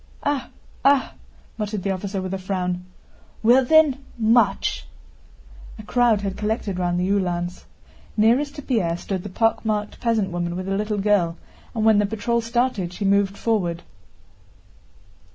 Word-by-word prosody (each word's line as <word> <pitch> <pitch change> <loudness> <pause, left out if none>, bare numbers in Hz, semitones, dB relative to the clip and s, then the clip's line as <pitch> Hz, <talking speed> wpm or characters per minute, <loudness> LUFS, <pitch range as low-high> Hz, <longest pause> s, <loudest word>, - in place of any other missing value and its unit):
"Ah, 285 -2 -1 0.3
ah!" 275 -1 +3 0.5
muttered 210 -2 -3
the 195 - 0
officer 190 0 -3
with 185 0 -4
a 195 - -2
frown. 180 -1 -3 0.6
"Well 245 +4 +6
then, 285 -1 +4
march!" 230 +1 +2 0.9
A 215 - -9
crowd 235 -1 +2
had 195 -1 -3
collected 210 -3 -2
round 175 -1 0
the 180 - 0
Uhlans. 180 -3 -1 0.5
Nearest 250 +7 +3
to 290 - -7
Pierre 185 -11 0
stood 190 +1 -4
the 205 - -7
pockmarked 215 0 0
peasant 220 -5 0
woman 175 0 -2
with 185 +1 -4
the 195 0 -1
little 210 +1 -1
girl, 195 -5 +2 0.4
and 220 -1 0
when 220 -2 +6
the 205 - +2
patrol 225 +3 -1
started 230 -6 -1
she 200 - -4
moved 200 0 +2
forward. 180 -7 -1
205 Hz, 150 wpm, -23 LUFS, 185-230 Hz, 0.9 s, Well